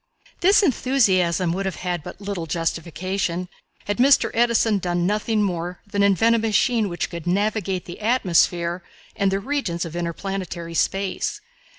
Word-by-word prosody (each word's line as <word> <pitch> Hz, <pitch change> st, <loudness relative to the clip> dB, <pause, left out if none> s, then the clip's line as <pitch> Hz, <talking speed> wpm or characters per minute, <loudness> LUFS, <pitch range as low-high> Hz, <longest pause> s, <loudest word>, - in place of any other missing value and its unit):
This 395 Hz, +3 st, +5 dB
enthusiasm 190 Hz, -, +2 dB
would 195 Hz, +2 st, -2 dB
have 190 Hz, -, -3 dB
had 175 Hz, -2 st, -3 dB
but -, -, -10 dB
little 200 Hz, -5 st, -4 dB
justification 170 Hz, +2 st, -2 dB, 0.4 s
had 205 Hz, +3 st, -2 dB
Mr. 270 Hz, +2 st, +5 dB
Edison 230 Hz, -3 st, +2 dB
done 175 Hz, -1 st, -1 dB
nothing 210 Hz, +2 st, +1 dB
more 175 Hz, -2 st, -3 dB
than 200 Hz, -1 st, -2 dB
invent 200 Hz, +4 st, +4 dB
a -, -, +2 dB
machine 225 Hz, 0 st, +1 dB
which 175 Hz, -, -3 dB
could 170 Hz, -1 st, -7 dB
navigate 195 Hz, -1 st, 0 dB
the 175 Hz, -, -9 dB
atmosphere 175 Hz, -6 st, +1 dB, 0.3 s
and 200 Hz, -2 st, +1 dB
the 195 Hz, -, 0 dB
regions 200 Hz, -9 st, -2 dB
of 165 Hz, 0 st, -8 dB
interplanetary 175 Hz, 0 st, -4 dB
space. 195 Hz, +3 st, -1 dB
195 Hz, 150 wpm, -23 LUFS, 175-215 Hz, 0.4 s, This